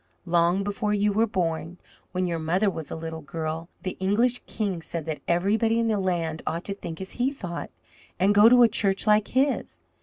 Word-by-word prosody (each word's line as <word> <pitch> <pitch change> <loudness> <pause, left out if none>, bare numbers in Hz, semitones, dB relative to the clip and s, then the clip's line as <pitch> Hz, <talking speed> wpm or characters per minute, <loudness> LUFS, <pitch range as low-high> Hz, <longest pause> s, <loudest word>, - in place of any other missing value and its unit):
"Long 175 +2 +2
before 210 +1 -1
you 205 0 +2
were 225 +3 +3
born, 170 -3 -2 0.3
when 185 0 -1
your 170 -2 -2
mother 180 +6 +1
was 160 -5 -7
a - - -4
little 160 0 -6
girl, 160 +3 -5
the 185 - -4
English 230 +6 +2
king 195 -6 -2
said 165 -1 -5
that 155 -2 -4
everybody 215 +6 +2
in 230 -1 +1
the 215 -2 +1
land 170 -4 -1
ought 170 +2 -2
to 200 - -3
think 165 -5 -7
as 190 0 -6
he 250 +2 0
thought, 175 -11 -6 0.5
and 195 +2 +4
go 205 +2 +8
to 245 0 +7
a - - +8
church 195 -2 0
like 210 -1 +4
his. 270 +2 0
190 Hz, 205 wpm, -26 LUFS, 165-210 Hz, 0.5 s, go